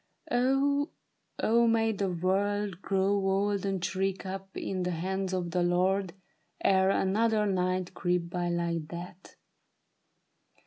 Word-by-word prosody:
" - - -46
Oh, 270 +4 +2 0.5
oh 235 +1 +3
may 225 -1 +3
the 200 -2 -1
world 195 +2 0
Grow 195 0 +1
old 195 +1 +1
and 190 -2 -1
shrink 190 +1 -2
up 195 0 -6
in 185 -1 -3
the 180 - -1
hands 190 +2 -2
of 180 -2 -2
the 180 - +1
Lord 180 +1 +1 0.5
Ere 190 0 +4
another 210 +3 +2
night 185 -1 0
creep 175 -2 0
by 175 -1 -1
like 170 -2 -1
that 175 +2 -9
190 Hz, 135 wpm, -29 LUFS, 180-205 Hz, 0.5 s, Ere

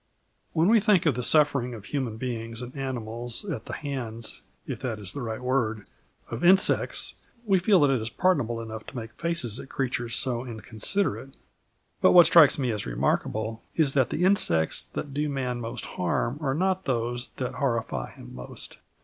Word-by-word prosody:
When 160 +2 +3
we 225 +2 +6
think 205 -5 +3
of 150 - +4
the 125 - -3
sufferings 140 -3 +3
of 105 -2 -10
human 125 -3 -3
beings 115 -1 -4
and 125 +3 -9
animals 120 - -3
at 145 - -4
the - - -7
hands 120 -6 -5 0.2
if - - -5
that 120 -4 -3
is 100 -3 -6
the 140 - -5
right 110 -1 -4
word 120 -5 -1 0.5
of - - -4
insects, 190 +2 +3 0.3
we 195 -3 +4
feel 190 +1 +4
that 145 -1 +5
it 130 -4 +1
is 110 - -3
pardonable 120 -8 +1
enough 110 -1 -7
to - - -10
make 115 -2 -6
faces 165 -8 -2
at - - -9
creatures 120 -3 -2
so 125 -2 0
inconsiderate. 130 - -2 0.7
But - - +6
what 175 -2 +9
strikes 160 -4 +7
one 130 -4 0
as 105 - -3
remarkable 110 - -1
is 150 -5 +2
that 130 -3 +3
the 175 - -1
insects 85 - +3
that 145 - -6
do 150 +1 -1
man 125 -3 -2
most 115 0 -5
harm 115 +9 -1
are 135 -3 0
not 190 +3 0
those 120 -1 -1
that 125 - -3
horrify 115 - -1
him - - -12
most. 60 0 -7
125 Hz, 185 wpm, -27 LUFS, 115-145 Hz, 0.7 s, what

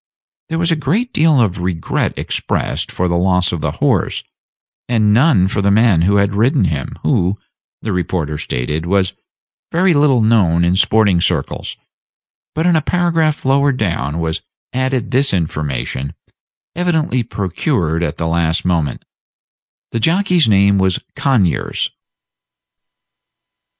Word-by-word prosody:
There 165 - -2
was 170 0 +1
a - - +3
great 185 - -1
deal 155 -3 +3
of 100 -5 +1
regret 90 -2 -2
expressed - - -2
for 90 - -1
the 85 0 0
loss 90 -1 +1
of 85 - -4
the - - -2
horse, - - 0 0.7
and 110 -3 +2
none 120 - +4
for 100 - -1
the 100 - +2
man 105 -4 +4
who 100 +4 +2
had 100 -1 +2
ridden 110 +3 +2
him, 75 -6 -2
who, 95 +4 +1 0.5
the 110 - -2
reporter 80 -4 -2
stated, 75 +4 -3
was 95 0 +1 0.6
very 180 +2 +3
little 145 -5 +3
known 95 -7 +3
in 90 +1 +2
sporting 100 -2 +3
circles; - - -2 0.8
but 160 +2 0
in 175 -1 +3
a 160 - +3
paragraph 165 -3 0
lower 140 +1 +3
down 85 - -2
was 80 -1 -2 0.3
added 130 -1 -1
this 130 -3 +2
information, 70 -5 -3 0.6
evidently 160 -7 0
procured 95 - -2
at 85 - -2
the 80 - -2
last 80 +1 0
moment: 80 -6 -1 0.9
"The 115 - -2
jockey's 175 - +2
name 100 -1 +4
was 95 -1 +2 0.2
Conyers." 115 - 0
100 Hz, 140 wpm, -17 LUFS, 85-140 Hz, 0.9 s, none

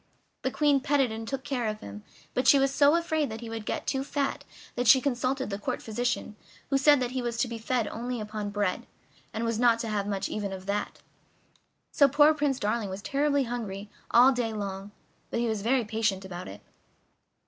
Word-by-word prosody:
The 260 - 0
Queen 290 0 +3
petted 275 -3 +2
and 225 0 -6
took 270 +1 -3
care 250 -5 -2
of 215 0 -3
him, 100 +1 -9 0.3
but 255 - 0
she 285 - +8
was 275 0 +2
so 285 +2 +5
afraid 315 -3 0
that 220 +1 -6
he 230 -1 -7
would 225 -2 -6
get - - -2
too 270 -1 -1
fat 280 0 -2 0.3
that 245 0 -1
she 265 - +8
consulted 260 -1 -1
the 200 - -3
court - - -3
physician, 230 -1 -2 0.4
who 275 - +4
said 290 0 +6
that 250 -1 -2
he 255 0 -2
was 240 -1 -3
to 230 - +1
be 235 -1 -6
fed 235 0 0
only 240 +1 -4
upon 210 -1 -4
bread, 205 -2 -1 0.4
and 225 +1 -3
was 230 -1 -1
not 235 -2 +5
to 225 - -4
have 205 -1 -1
much 195 -1 -2
even 205 -2 -3
of 190 0 -8
that. 205 +1 -3 0.9
So 280 - +5
poor 295 +3 +6
Prince 290 -3 0
Darling 210 0 -1
was 190 +2 -6
terribly 285 0 +1
hungry 210 -5 -5 0.2
all 250 +3 +7
day 240 -3 -1
long, 200 -1 -5 0.4
but - - -2
he 240 - +1
was 220 -2 -1
very 240 +2 +2
patient 210 -3 -1
about 180 -1 -7
it. 100 - -10
235 Hz, 215 wpm, -28 LUFS, 210-270 Hz, 0.9 s, she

